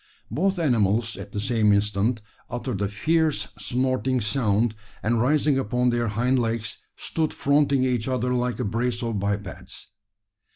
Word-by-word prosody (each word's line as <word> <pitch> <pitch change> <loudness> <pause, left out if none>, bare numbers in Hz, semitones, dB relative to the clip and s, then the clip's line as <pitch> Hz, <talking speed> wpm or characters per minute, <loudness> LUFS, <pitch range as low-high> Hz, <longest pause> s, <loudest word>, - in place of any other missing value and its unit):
Both 195 +4 +1
animals, 115 - +2
at 100 0 -9
the 100 - -3
same 105 0 +2
instant, 105 +3 +1 0.3
uttered 120 -4 -3
a 100 - +1
fierce, 150 +1 +1
snorting 130 +4 0
sound, 110 -1 +1 0.3
and 115 +1 +2
rising 145 +1 +3
upon 125 +1 +1
their 120 -1 0
hind 125 +5 +1
legs, 115 -1 -1 0.2
stood 160 -1 -1
fronting 140 -2 +2
each 125 -3 0
other 125 -1 0
like 125 -2 -1
a 125 - -1
brace 115 +3 -1
of 115 -3 -1
bipeds. 100 -2 -4
120 Hz, 150 wpm, -25 LUFS, 105-130 Hz, 0.3 s, rising